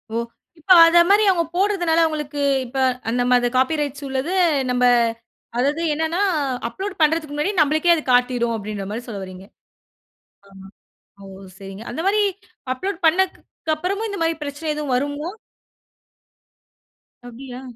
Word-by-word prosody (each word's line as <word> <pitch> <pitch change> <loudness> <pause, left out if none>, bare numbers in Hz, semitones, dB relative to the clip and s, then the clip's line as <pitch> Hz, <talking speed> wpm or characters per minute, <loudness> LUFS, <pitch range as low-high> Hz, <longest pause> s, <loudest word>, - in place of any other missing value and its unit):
ஓ! - - 0 0.4
இப்ப 375 +5 -2
அதமாரி 345 +5 +5
அவுங்க 345 -3 +2
போடுறதுனால 350 -4 +2
அவுங்களுக்கு 300 -2 -3 0.3
இப்ப 255 +3 -8 0.3
அந்தமாரி 245 0 +2
காப்பி 260 +5 +2
ரைட்ஸ் 285 0 -4
உள்ளது 265 +6 -3 0.4
நம்ப 250 0 +2 0.7
அதாது 285 +6 0
என்னன்னா, 320 +4 -2 0.5
அப்லோட் 390 +9 -6
பண்றதுக்கு 310 -1 +1
முன்னாடி 300 +7 -1
நம்மளுக்கே 310 +3 +3
அது 320 - 0
காட்டிரும் 245 -1 +2
அப்பிடின்றமாரி 210 +1 -5
சொல்ல 205 -4 -6
வர்றீங்க! 185 0 -10 1.0
ஆமா. 195 0 -14 0.6
ஓ! - - -11 0.3
சரிங்க 195 +2 -9
அந்தமாரி 390 - +1 0.5
அப்லோட் 380 +7 -4
பண்ணதுக்கு 340 -1 0
அப்புறமும் 395 +7 -3
இந்தமாரி 330 -5 -1
பிரச்சனை 295 +2 -4
எதுவும் 295 -4 -3
வருமோ? 285 +4 -2 2.0
அப்பிடியா? 250 +1 -9
295 Hz, 120 wpm, -21 LUFS, 245-335 Hz, 2.0 s, அதமாரி